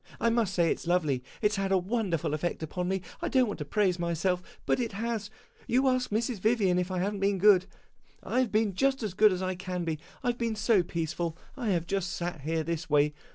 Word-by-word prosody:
I 230 Hz, -, +2 dB
must 225 Hz, -5 st, +1 dB
say 170 Hz, -2 st, +3 dB
it -, -, -1 dB
's -, -, -10 dB
lovely; 155 Hz, -8 st, +1 dB, 0.2 s
it 210 Hz, -, +4 dB
's -, -, -1 dB
had 195 Hz, 0 st, -1 dB
a 190 Hz, -, +5 dB
wonderful 185 Hz, -6 st, -1 dB
effect 160 Hz, +1 st, -2 dB
upon 180 Hz, +3 st, -3 dB
me. 190 Hz, -1 st, -1 dB, 0.2 s
I -, -, -1 dB
don't 260 Hz, -2 st, +4 dB
want 205 Hz, -5 st, -5 dB
to 150 Hz, -, -3 dB
praise 185 Hz, +2 st, +1 dB
myself, 175 Hz, +2 st, 0 dB, 0.2 s
but -, -, +2 dB
it 235 Hz, -3 st, -2 dB
has. 220 Hz, 0 st, -3 dB, 0.4 s
You 260 Hz, +3 st, +3 dB
ask 255 Hz, -1 st, +1 dB
Mrs. 225 Hz, +1 st, -1 dB
Vivian 200 Hz, -4 st, +2 dB
if 180 Hz, 0 st, -1 dB
I 185 Hz, -, -2 dB
have 195 Hz, +4 st, 0 dB
n't 200 Hz, -, -5 dB
been 200 Hz, 0 st, +1 dB
good. 190 Hz, -1 st, +5 dB, 0.6 s
I 255 Hz, -, 0 dB
have 255 Hz, -4 st, +1 dB
been 215 Hz, -2 st, +2 dB
just 270 Hz, +5 st, +1 dB
as 210 Hz, -4 st, -2 dB
good 210 Hz, +2 st, +6 dB
as 185 Hz, 0 st, -2 dB
I 185 Hz, 0 st, -1 dB
can 180 Hz, -1 st, -4 dB
be. 160 Hz, -2 st, -2 dB, 0.2 s
I 245 Hz, -, +1 dB
have 240 Hz, -, -2 dB
been 230 Hz, -2 st, -1 dB
so 210 Hz, -2 st, +3 dB
peaceful, 170 Hz, -1 st, -3 dB, 0.2 s
I 245 Hz, -5 st, -2 dB
have 170 Hz, -4 st, +1 dB
just 195 Hz, 0 st, -2 dB
sat 175 Hz, -3 st, -4 dB
here 160 Hz, +2 st, -1 dB
this 165 Hz, 0 st, -3 dB
way. 150 Hz, 0 st, +3 dB
190 Hz, 245 wpm, -29 LUFS, 170-220 Hz, 0.6 s, good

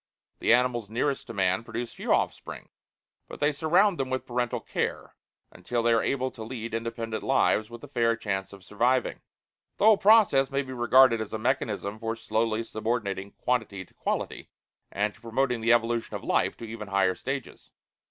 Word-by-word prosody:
The -, -, +2 dB
animals 120 Hz, -3 st, +2 dB
nearest 135 Hz, +5 st, -1 dB
to 115 Hz, -, -7 dB
man 95 Hz, +2 st, +1 dB
produce 115 Hz, +1 st, -5 dB
few -, -, -4 dB
offspring, -, -, -1 dB, 0.6 s
but -, -, -10 dB
they 145 Hz, +1 st, +3 dB
surround 170 Hz, +5 st, +2 dB
them 135 Hz, -1 st, -1 dB
with 130 Hz, 0 st, -2 dB
parental 120 Hz, -1 st, -1 dB
care, -, -, -4 dB, 0.4 s
until 120 Hz, -1 st, -3 dB
they 120 Hz, 0 st, +4 dB
are 115 Hz, -, +3 dB
able 130 Hz, -1 st, -1 dB
to 115 Hz, -, -12 dB
lead 115 Hz, -1 st, -6 dB
independent 115 Hz, -1 st, -3 dB
lives 110 Hz, +1 st, +2 dB
with 120 Hz, -1 st, -11 dB
a -, -, -8 dB
fair 115 Hz, -4 st, +1 dB
chance 95 Hz, -4 st, -3 dB
of 100 Hz, -2 st, -13 dB
surviving. 120 Hz, +6 st, 0 dB, 0.6 s
The 200 Hz, -, +2 dB
whole 220 Hz, -2 st, +7 dB
process 200 Hz, -11 st, +5 dB
may 140 Hz, 0 st, -1 dB
be 130 Hz, -1 st, -8 dB
regarded 120 Hz, -1 st, +5 dB
as 110 Hz, -, -6 dB
a -, -, -1 dB
mechanism 110 Hz, -4 st, -2 dB
for 115 Hz, 0 st, -3 dB
slowly 110 Hz, 0 st, -1 dB
subordinating 110 Hz, -3 st, -3 dB
quantity 110 Hz, -6 st, -2 dB
to -, -, -28 dB
quality, -, -, -3 dB, 0.4 s
and 105 Hz, +2 st, -1 dB
to -, -, -22 dB
promoting 125 Hz, +1 st, -1 dB
the 115 Hz, +1 st, +3 dB
evolution 120 Hz, 0 st, +1 dB
of -, -, -6 dB
life -, -, +1 dB
to -, -, -10 dB
even 110 Hz, -2 st, -7 dB
higher 95 Hz, -1 st, +2 dB
stages. 135 Hz, +5 st, -6 dB
115 Hz, 180 wpm, -27 LUFS, 110-130 Hz, 0.6 s, whole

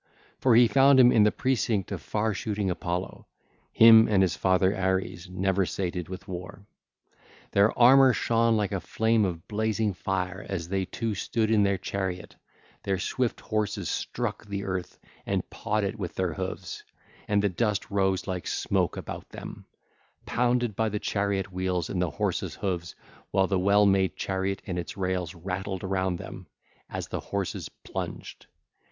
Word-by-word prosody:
For 125 Hz, -3 st, +4 dB
he 120 Hz, 0 st, +7 dB
found 135 Hz, +2 st, +5 dB
him 125 Hz, -1 st, +8 dB
in 110 Hz, -, +5 dB
the 105 Hz, -, +4 dB
close 130 Hz, +1 st, 0 dB
of 100 Hz, -5 st, -1 dB
far 110 Hz, 0 st, -1 dB
shooting 100 Hz, -1 st, -2 dB
Apollo, 90 Hz, +1 st, -4 dB, 0.4 s
him 115 Hz, 0 st, +8 dB
and 100 Hz, -3 st, +4 dB
his 90 Hz, -, +1 dB
father 95 Hz, +1 st, +2 dB
Ares, 95 Hz, -1 st, -1 dB
never 95 Hz, +1 st, +1 dB
sated 90 Hz, -2 st, -3 dB
with 95 Hz, +2 st, -8 dB
war. 90 Hz, +1 st, -8 dB, 0.9 s
Their 100 Hz, +2 st, +3 dB
armour 130 Hz, +2 st, +7 dB
shone 115 Hz, -1 st, +2 dB
like 105 Hz, -2 st, -1 dB
a 100 Hz, -, -1 dB
flame 110 Hz, +4 st, +1 dB
of 85 Hz, -3 st, -4 dB
blazing 110 Hz, -1 st, 0 dB
fire 90 Hz, 0 st, -3 dB
as 85 Hz, -4 st, -4 dB
they 95 Hz, 0 st, 0 dB
two 115 Hz, +3 st, -3 dB
stood 110 Hz, +2 st, -1 dB
in 110 Hz, -2 st, +4 dB
their 100 Hz, -1 st, +2 dB
car: 95 Hz, 0 st, -2 dB, 0.7 s
their 95 Hz, -1 st, -1 dB
swift 120 Hz, +6 st, -2 dB
horses 105 Hz, -5 st, -2 dB
struck -, -, -3 dB
the 100 Hz, -1 st, -4 dB
earth 95 Hz, -2 st, -4 dB, 0.3 s
and -, -, -1 dB
pawed 105 Hz, 0 st, -1 dB
it 100 Hz, +2 st, -3 dB
with 90 Hz, -4 st, -5 dB
their 90 Hz, -3 st, -1 dB
hoofs, 95 Hz, 0 st, -5 dB, 0.4 s
and 105 Hz, 0 st, +2 dB
the 100 Hz, -, +3 dB
dust 105 Hz, +3 st, -1 dB
rose 95 Hz, -1 st, +1 dB
like 90 Hz, -2 st, -4 dB
smoke -, -, 0 dB
about -, -, -7 dB
them, -, -, -9 dB, 0.6 s
pounded 120 Hz, -2 st, +1 dB
by 110 Hz, +1 st, +1 dB
the 105 Hz, -, -2 dB
chariot 100 Hz, -2 st, -1 dB
wheels 90 Hz, -2 st, -2 dB
and 90 Hz, -, -1 dB
the 90 Hz, -, +1 dB
horses' -, -, -2 dB
hoofs, 90 Hz, -4 st, -3 dB, 0.3 s
while 95 Hz, -, +3 dB
the 95 Hz, -1 st, 0 dB
well 100 Hz, +2 st, +4 dB
made 95 Hz, -1 st, +2 dB
chariot 95 Hz, 0 st, -2 dB
and 90 Hz, -1 st, -3 dB
its 85 Hz, -, -6 dB
rails 90 Hz, -2 st, -2 dB
rattled 95 Hz, +2 st, -4 dB
around 95 Hz, -1 st, 0 dB
them -, -, -9 dB, 0.4 s
as -, -, -5 dB
the -, -, -3 dB
horses 100 Hz, -2 st, -4 dB
plunged. -, -, -6 dB
95 Hz, 165 wpm, -27 LUFS, 95-110 Hz, 0.9 s, him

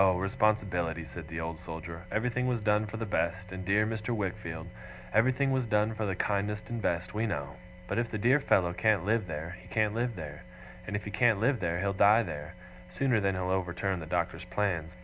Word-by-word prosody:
Responsibility!' 95 Hz, -4 st, +2 dB
said 80 Hz, 0 st, -9 dB
the 80 Hz, 0 st, -5 dB
Old 80 Hz, 0 st, -4 dB
Soldier. 85 Hz, +1 st, -7 dB
'Everything 125 Hz, +3 st, 0 dB
was 125 Hz, -2 st, +1 dB
done 105 Hz, 0 st, +2 dB
for 110 Hz, -, -6 dB
the 115 Hz, -, -2 dB
best, 95 Hz, -1 st, -1 dB
my 95 Hz, -, -5 dB
dear 100 Hz, +3 st, +2 dB
Mr. 110 Hz, +1 st, -2 dB
Wickfield; 85 Hz, -5 st, -3 dB, 0.5 s
everything 130 Hz, +5 st, +3 dB
was 130 Hz, -2 st, +1 dB
done 105 Hz, +1 st, +2 dB
for 110 Hz, -1 st, -2 dB
the 95 Hz, -, -1 dB
kindest 105 Hz, +3 st, -1 dB
and 120 Hz, -1 st, -2 dB
best, 90 Hz, -1 st, -1 dB
we 110 Hz, +2 st, 0 dB
know. 70 Hz, -7 st, -3 dB, 0.3 s
But -, -, 0 dB
if 120 Hz, -1 st, -1 dB
the 110 Hz, -, -3 dB
dear 125 Hz, +7 st, +4 dB
fellow 90 Hz, -10 st, +3 dB
can't 105 Hz, -2 st, +2 dB
live 110 Hz, -1 st, +1 dB
there, 80 Hz, +3 st, -5 dB
he 90 Hz, -, -16 dB
can't 105 Hz, +3 st, +1 dB
live 120 Hz, 0 st, -1 dB
there. 75 Hz, -4 st, -7 dB, 0.5 s
And -, -, -2 dB
if 100 Hz, -, -2 dB
he 105 Hz, -, -5 dB
can't 115 Hz, -4 st, +3 dB
live 125 Hz, +3 st, +2 dB
there, 85 Hz, -2 st, -1 dB
he'll 100 Hz, 0 st, +1 dB
die 105 Hz, +4 st, +6 dB
there, 75 Hz, -1 st, -6 dB, 0.3 s
sooner 115 Hz, +5 st, +2 dB
than 100 Hz, -2 st, +1 dB
he'll 95 Hz, 0 st, -1 dB
overturn 95 Hz, 0 st, -1 dB
the 80 Hz, -, -7 dB
Doctor's 85 Hz, 0 st, -1 dB
plans. 90 Hz, -4 st, -1 dB
100 Hz, 210 wpm, -30 LUFS, 85-110 Hz, 0.5 s, die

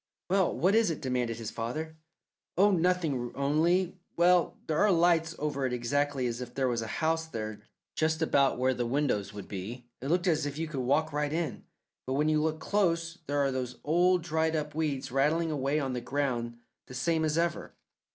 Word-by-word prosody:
"Well, 190 Hz, -2 st, +2 dB
what 185 Hz, +3 st, +3 dB
is 225 Hz, -3 st, +4 dB
it?" 160 Hz, -, -3 dB
demanded 125 Hz, -4 st, -1 dB
his 115 Hz, -2 st, -5 dB
father. 155 Hz, +8 st, -4 dB, 0.6 s
"Oh, 205 Hz, +3 st, +5 dB
nothing, 165 Hz, -9 st, +1 dB
only 170 Hz, +6 st, +1 dB, 0.2 s
well, 175 Hz, 0 st, +4 dB
there 155 Hz, -1 st, 0 dB
are 210 Hz, 0 st, +5 dB
lights 165 Hz, -1 st, +3 dB
over 145 Hz, -2 st, -2 dB
it 125 Hz, -, -3 dB
exactly 135 Hz, +2 st, 0 dB
as 120 Hz, 0 st, -2 dB
if 120 Hz, -1 st, -8 dB
there 135 Hz, -1 st, +1 dB
was 120 Hz, -2 st, 0 dB
a 110 Hz, -, -4 dB, 0.2 s
house 160 Hz, 0 st, +1 dB
there, 110 Hz, -6 st, -5 dB, 0.3 s
just 160 Hz, 0 st, 0 dB
about 140 Hz, -4 st, +3 dB
where 130 Hz, +1 st, +2 dB
the 120 Hz, -1 st, -2 dB
windows 120 Hz, -7 st, 0 dB
would 105 Hz, -2 st, -8 dB
be. 110 Hz, +6 st, -6 dB, 0.2 s
It 135 Hz, -, -4 dB
looked 175 Hz, +4 st, +1 dB
as 160 Hz, -4 st, +2 dB
if 145 Hz, 0 st, -5 dB
you 165 Hz, +1 st, -2 dB
could 150 Hz, -3 st, -4 dB
walk 145 Hz, +5 st, +1 dB
right 150 Hz, 0 st, 0 dB
in, 160 Hz, -4 st, -3 dB, 0.4 s
but 130 Hz, -, -1 dB
when 150 Hz, +3 st, +2 dB
you 155 Hz, -1 st, +3 dB
look 155 Hz, 0 st, -1 dB
close 170 Hz, -4 st, 0 dB
there 145 Hz, 0 st, +1 dB
are 135 Hz, -, +1 dB
those 125 Hz, -1 st, -4 dB
old 175 Hz, +3 st, +3 dB
dried 160 Hz, 0 st, 0 dB
up 150 Hz, -1 st, -2 dB
weeds 150 Hz, -5 st, -2 dB
rattling 155 Hz, +5 st, +2 dB
away 140 Hz, 0 st, 0 dB
on 135 Hz, -3 st, -2 dB
the 125 Hz, -, -3 dB
ground 120 Hz, -3 st, -2 dB, 0.3 s
the 125 Hz, -, -9 dB
same 160 Hz, +5 st, +1 dB
as 155 Hz, 0 st, 0 dB
ever. 170 Hz, 0 st, -1 dB
150 Hz, 200 wpm, -29 LUFS, 130-165 Hz, 0.6 s, Oh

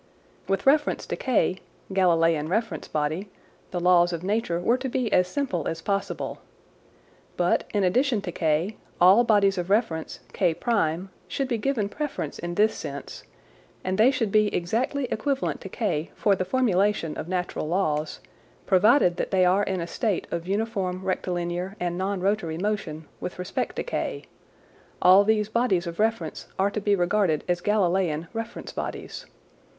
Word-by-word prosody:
With 195 Hz, 0 st, -1 dB
reference 295 Hz, +2 st, +3 dB
to -, -, -3 dB
K 240 Hz, -7 st, +1 dB, 0.4 s
(Galileian 165 Hz, -4 st, +3 dB
reference 205 Hz, -4 st, -1 dB
body) 155 Hz, +6 st, -2 dB, 0.4 s
the 180 Hz, -, -3 dB
laws 175 Hz, 0 st, +4 dB
of 170 Hz, 0 st, -4 dB
nature 200 Hz, -3 st, 0 dB
were 235 Hz, +8 st, +2 dB
to 265 Hz, 0 st, -3 dB
be 240 Hz, -4 st, -1 dB
as 180 Hz, 0 st, +4 dB
simple 190 Hz, -, -2 dB
as 165 Hz, 0 st, -4 dB
possible. 200 Hz, -1 st, -2 dB, 1.0 s
But -, -, +2 dB
in 205 Hz, -2 st, +1 dB
addition 240 Hz, +6 st, +2 dB
to 175 Hz, -, -4 dB
K, 165 Hz, +6 st, 0 dB, 0.2 s
all 190 Hz, +7 st, +7 dB
bodies 200 Hz, -4 st, +3 dB
of 175 Hz, +1 st, -4 dB
reference 195 Hz, -7 st, 0 dB
K1 180 Hz, -1 st, 0 dB, 0.2 s
should 275 Hz, -, -2 dB
be 235 Hz, -3 st, -1 dB
given 225 Hz, -3 st, 0 dB
preference 295 Hz, +7 st, -4 dB
in 175 Hz, 0 st, -4 dB
this 215 Hz, +3 st, +3 dB
sense, 140 Hz, -1 st, -7 dB, 0.6 s
and 185 Hz, +2 st, -2 dB
they 230 Hz, +4 st, +7 dB
should 230 Hz, -6 st, 0 dB
be 215 Hz, 0 st, +4 dB
exactly 240 Hz, +10 st, -1 dB
equivalent 270 Hz, +5 st, -1 dB
to 195 Hz, -, -7 dB
K 175 Hz, -7 st, -2 dB
for 200 Hz, -2 st, +3 dB
the 185 Hz, -, -2 dB
formulation 205 Hz, -7 st, +1 dB
of -, -, -5 dB
natural 180 Hz, -3 st, -2 dB
laws, 155 Hz, -3 st, -1 dB, 0.4 s
provided 195 Hz, -1 st, +4 dB
that -, -, -2 dB
they 185 Hz, -2 st, +3 dB
are 185 Hz, +3 st, +4 dB
in 190 Hz, -2 st, -1 dB
a -, -, -2 dB
state 205 Hz, +2 st, -1 dB
of 170 Hz, 0 st, -3 dB
uniform 195 Hz, -3 st, -2 dB
rectilinear 180 Hz, 0 st, -2 dB
and 175 Hz, -1 st, -1 dB
non 190 Hz, +1 st, -2 dB
rotary 190 Hz, -5 st, 0 dB
motion 180 Hz, -5 st, -3 dB
with 180 Hz, -, -5 dB
respect 180 Hz, +1 st, -3 dB
to -, -, -2 dB
K; -, -, -3 dB, 0.8 s
all 185 Hz, +2 st, +7 dB
these 210 Hz, 0 st, +2 dB
bodies 215 Hz, -6 st, +1 dB
of 170 Hz, 0 st, -6 dB
reference 215 Hz, -7 st, -1 dB
are 195 Hz, +1 st, +2 dB
to 210 Hz, -, -3 dB
be 205 Hz, 0 st, +3 dB
regarded 175 Hz, -3 st, +1 dB
as 175 Hz, 0 st, 0 dB
Galileian 180 Hz, -6 st, +1 dB
reference 225 Hz, +1 st, -5 dB
bodies. -, -, -6 dB
190 Hz, 160 wpm, -25 LUFS, 175-215 Hz, 1.0 s, all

